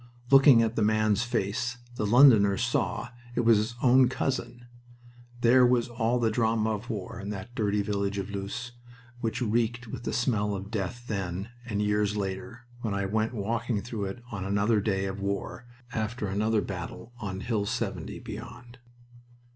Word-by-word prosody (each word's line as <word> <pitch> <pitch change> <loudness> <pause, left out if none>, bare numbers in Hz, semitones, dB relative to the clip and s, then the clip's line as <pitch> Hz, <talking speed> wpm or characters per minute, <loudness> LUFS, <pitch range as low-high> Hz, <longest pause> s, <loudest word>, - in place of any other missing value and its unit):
Looking 135 -4 +8
at 115 0 -1
the - - 0
man's 110 0 +3
face, 120 +1 -1 0.2
the 105 -3 -1
Londoner 110 -5 +6
saw 120 0 -1 0.3
it - - +2
was 115 -2 +5
his 110 +3 -3
own 130 0 +6
cousin... 125 -2 -3 0.8
There 125 +2 +6
was 125 -1 +3
all 120 +1 0
the 115 -2 +1
drama 110 -1 +1
of 110 +3 -4
war 105 0 -5
in 100 0 -6
that 105 +3 -6
dirty 105 -4 0
village 100 -1 -1
of 100 +1 -4
Loos, 100 +5 -5 0.5
which 115 +1 -2
reeked 120 +2 0
with 110 - -7
the - - -3
smell 105 -5 0
of 100 +2 -7
death 110 +3 -3
then, 95 0 -3 0.2
and 105 -2 -1
years 105 0 +1
later, 105 +5 -4 0.2
when 110 -4 -2
I 100 0 -1
went 110 +4 -1
walking 115 +1 -1
through 110 -3 -4
it 110 +5 -6
on 100 -3 -4
another 100 +2 +2
day 95 -2 0
of 95 0 -4
war, 100 +4 -4 0.3
after 110 0 -2
another 105 +3 +1
battle 95 +5 -7
on 95 -3 -4
Hill 110 -4 -1
70, - - -3
beyond. 120 +1 -9
110 Hz, 170 wpm, -28 LUFS, 100-120 Hz, 0.8 s, Looking